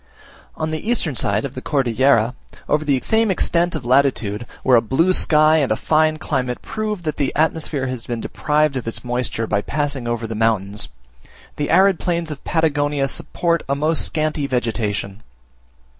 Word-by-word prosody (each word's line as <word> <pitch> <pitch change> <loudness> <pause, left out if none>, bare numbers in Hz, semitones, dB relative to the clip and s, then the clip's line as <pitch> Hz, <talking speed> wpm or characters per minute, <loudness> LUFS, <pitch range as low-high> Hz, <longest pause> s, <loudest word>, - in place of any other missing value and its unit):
On 155 0 -3
the 155 +8 -4
eastern 175 - 0
side 105 0 +1
of 135 - -6
the 130 - -7
Cordillera, 125 -3 +2 0.3
over 150 +1 +1
the 140 -3 +1
same 220 0 +2
extent 175 -2 +1
of 145 -6 -5
latitude, 120 -4 +1 0.2
where 130 - +5
a 115 - +5
blue 165 +11 +2
sky 155 -2 +5
and 140 -6 +1
a - - +3
fine 155 +4 +2
climate 130 -5 -3
prove 215 -4 -4
that 155 -2 -3
the 140 -2 0
atmosphere 155 -3 0
has 130 -3 -5
been 120 -1 -3
deprived 150 +3 0
of 125 -3 -4
its 115 - -5
moisture 125 -2 -1
by 105 -2 0
passing 145 -2 -2
over 120 -1 -2
the 115 - -5
mountains, 105 -2 0 0.7
the 145 - -2
arid 190 +1 +4
plains 170 -2 -2
of 145 - -8
Patagonia 145 -3 0
support 170 +4 -1
a 140 - +2
most 155 +2 +2
scanty 155 -2 -1
vegetation. 110 -5 -2
140 Hz, 175 wpm, -20 LUFS, 120-155 Hz, 0.7 s, where